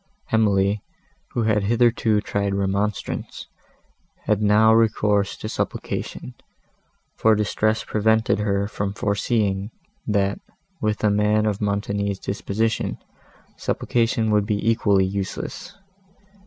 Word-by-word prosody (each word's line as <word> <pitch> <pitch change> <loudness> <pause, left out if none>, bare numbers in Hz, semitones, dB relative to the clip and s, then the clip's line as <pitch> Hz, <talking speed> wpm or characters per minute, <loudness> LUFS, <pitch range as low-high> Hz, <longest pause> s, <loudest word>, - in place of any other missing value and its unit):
Emily, 100 -2 +2 0.5
who 120 - 0
had 105 -2 +1
hitherto 115 -1 +2
tried 100 -2 -1
remonstrance, 100 +1 -2 0.8
had 105 -1 +1
now 105 +2 +5
recourse 105 -3 +2
to - - -6
supplication, 60 - -4 0.8
for 110 -1 +4
distress 110 +1 0
prevented 110 -1 +1
her 100 -1 0
from 100 -1 -4
foreseeing, 100 -1 0 0.4
that, 100 -2 +1 0.4
with 105 0 -1
a 105 - +4
man 105 +1 +2
of 105 -1 -1
Montoni's 100 -1 -1
disposition, 100 +3 -2 0.6
supplication 115 -2 0
would 105 -1 +2
be 105 0 -1
equally 105 -4 +3
useless. 100 - -5
105 Hz, 105 wpm, -23 LUFS, 100-110 Hz, 0.8 s, now